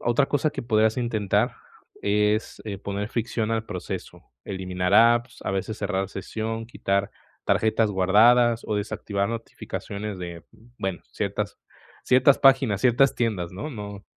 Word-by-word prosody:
otra 120 Hz, +4 st, +2 dB
cosa 145 Hz, +2 st, +1 dB
que 145 Hz, -4 st, -5 dB
podrías 110 Hz, -1 st, +2 dB
intentar 110 Hz, -5 st, 0 dB, 0.5 s
es, 105 Hz, +1 st, +1 dB
eh, 100 Hz, -3 st, -5 dB
poner 100 Hz, +1 st, -4 dB
fricción 115 Hz, -1 st, -2 dB
al 115 Hz, -1 st, 0 dB
proceso, 90 Hz, -3 st, -6 dB, 0.2 s
eliminar 95 Hz, -1 st, -2 dB
apps, 120 Hz, +2 st, +4 dB
a -, -, -2 dB
veces 95 Hz, +3 st, -2 dB
cerrar 95 Hz, -1 st, -1 dB
sesión, 110 Hz, +3 st, -4 dB
quitar 100 Hz, -4 st, -1 dB, 0.3 s
tarjetas 110 Hz, -1 st, +2 dB
guardadas 115 Hz, +5 st, +4 dB
o 105 Hz, -, -1 dB
desactivar 100 Hz, -1 st, -2 dB
notificaciones 105 Hz, -3 st, -6 dB
de, 85 Hz, -2 st, -7 dB, 0.3 s
bueno, 95 Hz, -2 st, -3 dB
ciertas -, -, -3 dB, 0.5 s
ciertas 130 Hz, +2 st, +5 dB
páginas, 135 Hz, -7 st, +4 dB
ciertas 130 Hz, +2 st, +4 dB
tiendas, 100 Hz, -8 st, -1 dB
¿no?, 120 Hz, +12 st, -5 dB
no 100 Hz, -4 st, -7 dB
110 Hz, 135 wpm, -25 LUFS, 100-120 Hz, 0.5 s, ciertas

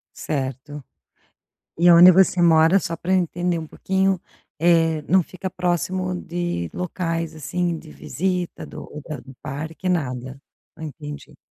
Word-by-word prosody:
Certo. 135 Hz, 0 st, -4 dB, 1.0 s
E 175 Hz, -, +5 dB
aonde 175 Hz, +1 st, +9 dB
você 185 Hz, 0 st, +4 dB
mora 165 Hz, +3 st, +5 dB
só 165 Hz, -, -4 dB
pra 185 Hz, +2 st, -1 dB
entender 175 Hz, -1 st, 0 dB
um 160 Hz, -, -7 dB
pouquinho, 190 Hz, +1 st, 0 dB, 0.4 s
eh, 165 Hz, -2 st, +3 dB
não 185 Hz, +3 st, +3 dB
fica 185 Hz, +2 st, -6 dB
próximo 180 Hz, +1 st, -1 dB
de 175 Hz, -, -3 dB
locais, 165 Hz, -2 st, -3 dB
assim, 170 Hz, +3 st, -2 dB
de 155 Hz, -, -12 dB
visita 180 Hz, 0 st, -3 dB
do -, -, -9 dB
ou 150 Hz, -, -8 dB
da 155 Hz, -3 st, -4 dB
do 135 Hz, +2 st, -13 dB
parque 160 Hz, +6 st, -5 dB
nada, 130 Hz, -5 st, -2 dB, 0.3 s
ah, 160 Hz, -, -10 dB
entendi. 150 Hz, -1 st, -8 dB
170 Hz, 140 wpm, -22 LUFS, 150-180 Hz, 1.0 s, aonde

